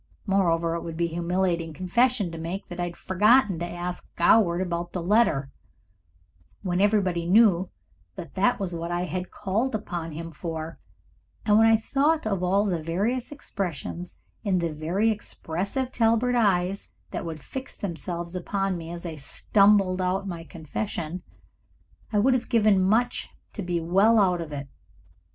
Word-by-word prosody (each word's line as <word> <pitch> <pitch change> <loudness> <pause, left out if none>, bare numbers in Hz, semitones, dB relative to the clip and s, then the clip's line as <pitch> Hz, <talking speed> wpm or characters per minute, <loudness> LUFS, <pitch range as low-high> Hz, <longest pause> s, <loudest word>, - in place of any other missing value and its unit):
Moreover, 170 -5 +2
it 170 - -2
would 165 -1 -6
be 170 - +1
a - - -9
humiliating 170 -1 0
confession 205 - +1
to 165 - -7
make 170 +4 -4
that 175 0 -7
I 175 - 0
had 175 -1 -7
forgotten 210 0 +3
to 175 - -3
ask 175 +1 -5
Goward 175 -1 +4
about 175 -2 -3
the 180 - -2
letter, 175 -9 +2 1.1
when 180 -1 0
everybody 190 -5 +2
knew 190 -2 +5 0.5
that - - -8
that 245 -1 +2
was 190 -3 -3
what 170 0 -4
I 175 0 0
had 180 0 -3
called 220 +5 -1
upon 175 -6 -4
him 165 +2 -6
for, 160 0 -6 0.7
and 210 0 +5
when 225 - +6
I 225 0 +6
thought 285 +7 +1
of 195 -4 -1
all 195 +3 +2
the 175 -5 -1
various 210 - -1
expressions 130 - -5 0.3
in 190 -2 +1
the 170 -3 -1
very 175 +9 +1
expressive 210 +5 -3
Talbert 230 +1 +2
eyes 195 -4 +1 0.2
that - - -3
would 165 -2 -5
fix 265 - -8
themselves 170 -2 -4
upon 190 0 -2
me 165 0 -8
as 170 +1 -7
I 160 -3 -6 0.4
mumbled 195 -2 +5
out 190 +2 0
my 170 -3 -5
confession, 170 +1 -5 0.9
I 210 - +1
would 250 +6 +4
have 250 -1 -1
given 215 -5 +4
much 225 +6 +1 0.2
to 210 - -5
be 175 -2 -1
well 195 +7 +4
out 180 -3 +3
of 160 -2 -6
it. 140 -1 -5
185 Hz, 165 wpm, -26 LUFS, 170-210 Hz, 1.1 s, when